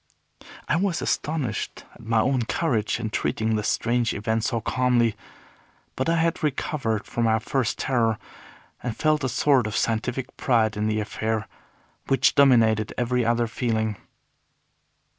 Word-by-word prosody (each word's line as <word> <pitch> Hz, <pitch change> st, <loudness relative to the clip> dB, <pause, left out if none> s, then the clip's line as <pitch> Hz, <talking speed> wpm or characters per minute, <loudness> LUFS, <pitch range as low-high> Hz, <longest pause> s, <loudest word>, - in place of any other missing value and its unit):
I 170 Hz, -, +2 dB
was 185 Hz, -1 st, 0 dB
astonished 145 Hz, -9 st, -2 dB
at -, -, -16 dB
my 115 Hz, 0 st, +2 dB
own 130 Hz, 0 st, +1 dB
courage 115 Hz, -8 st, 0 dB
in 110 Hz, -2 st, -3 dB
treating 110 Hz, 0 st, 0 dB
this 105 Hz, -1 st, -1 dB
strange 120 Hz, 0 st, 0 dB
event 110 Hz, +2 st, -1 dB
so 115 Hz, 0 st, 0 dB
calmly; 120 Hz, -1 st, +1 dB, 0.8 s
but 130 Hz, +4 st, -1 dB
I 165 Hz, -, +3 dB
had 165 Hz, 0 st, +1 dB
recovered 135 Hz, -7 st, -1 dB
from 120 Hz, -, -1 dB
my 110 Hz, 0 st, +3 dB
first 120 Hz, +2 st, -1 dB
terror, 115 Hz, -4 st, +1 dB, 0.6 s
and 120 Hz, -3 st, -4 dB
felt 155 Hz, -2 st, +2 dB
a 130 Hz, -, 0 dB
sort 130 Hz, -1 st, +3 dB
of 110 Hz, -, -3 dB
scientific 120 Hz, +3 st, -2 dB
pride 115 Hz, -4 st, +2 dB
in 105 Hz, +1 st, -1 dB
the 110 Hz, 0 st, 0 dB
affair, 110 Hz, +1 st, -2 dB, 0.6 s
which 135 Hz, -, +3 dB
dominated 115 Hz, -6 st, +4 dB
every 125 Hz, 0 st, +1 dB
other 120 Hz, +1 st, +2 dB
feeling. 110 Hz, -2 st, -1 dB
115 Hz, 145 wpm, -24 LUFS, 110-130 Hz, 0.8 s, dominated